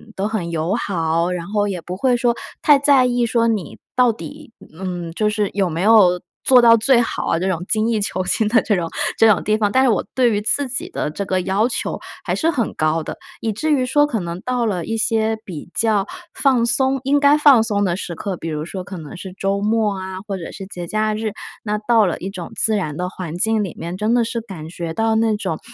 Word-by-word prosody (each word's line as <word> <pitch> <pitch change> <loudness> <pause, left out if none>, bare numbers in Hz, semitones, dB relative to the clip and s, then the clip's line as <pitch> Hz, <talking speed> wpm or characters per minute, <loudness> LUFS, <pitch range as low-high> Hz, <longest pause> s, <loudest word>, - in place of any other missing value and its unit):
都 195 +2 -1
很 200 -6 -3
友 165 +4 -1
好， 170 -5 0
然 175 -1 -4
后 205 0 0
也 185 -4 -4
不 180 +2 -6
会 255 +2 +2
说 240 -1 +1 0.3
太 295 -1 +6
在 275 -2 +4
意 245 -1 +1
说 230 0 +1
你 205 -9 -2 0.2
到 250 -2 +4
底， 285 +2 -10 0.3
嗯， 175 -3 -4
就 215 +5 0
是 210 -1 0
有 195 -2 +2
没 165 +1 -3
有 190 -4 +5 0.2
做 255 -2 +6
到 230 -1 +7
最 235 +2 +4
好 230 - -3
啊， - - +2
这 185 - -1
种 175 -2 -1
精 215 +1 +1
益 225 -2 +1
求 185 -2 -2
精 210 +3 0
的 230 +1 +4
这 210 - +1
种 170 -3 -2 0.3
这 225 - +7
种 210 -4 +3
地 215 - +2
方， 205 -2 +1
但 260 +3 +4
是 260 - +4
我 215 - +1
对 245 -2 +3
于 205 -1 0
自 275 +6 +1
己 315 +8 -3
的 350 - -3
这 200 - -4
个 185 0 0
要 195 +5 +1
求 255 - -3 0.2
还 - - -2
是 330 - +1
很 245 - -1
高 155 +1 0
的， - - -6 0.3
以 225 - -1
至 305 +9 -1
于 260 -3 +2
说 290 +3 +3
可 235 -6 -2
能 170 -1 -5
到 250 0 -1
了 185 -6 -1
一 225 0 -2
些 220 0 +1
比 170 -3 -8
较 210 -3 +1 0.3
放 255 -4 +2
松， 265 +3 +1
应 280 +2 +2
该 285 +1 +5
放 280 -6 +6
松 205 -2 0
的 175 -3 +1
时 175 -3 -5
刻， 190 +2 -4
比 165 - -7
如 150 0 -3
说 185 +2 -6
可 185 0 -8
能 155 -3 -9
是 190 +1 -8
周 195 +1 -1
末 215 -1 +1
啊， 185 0 -6
或 195 -2 -3
者 170 - -7
是 195 - -8
节 175 -3 -7
假 215 +2 0
日， 215 -1 -3 0.3
那 210 -1 -2
到 220 0 +3
了 170 - -2
一 190 - -5
种 180 -3 -7
自 220 - +2
然 155 -8 -2
的 180 0 -2
环 175 -3 -6
境 220 +2 +1
里 190 - -6
面， 170 +2 -5
真 215 +3 +1
的 240 - +3
是 230 +1 -3
感 180 -8 -9
觉 170 -1 -5
到 225 +4 +1
那 220 -1 +2
种， 160 -6 -3
210 Hz, 265 characters per minute, -20 LUFS, 180-235 Hz, 0.3 s, 到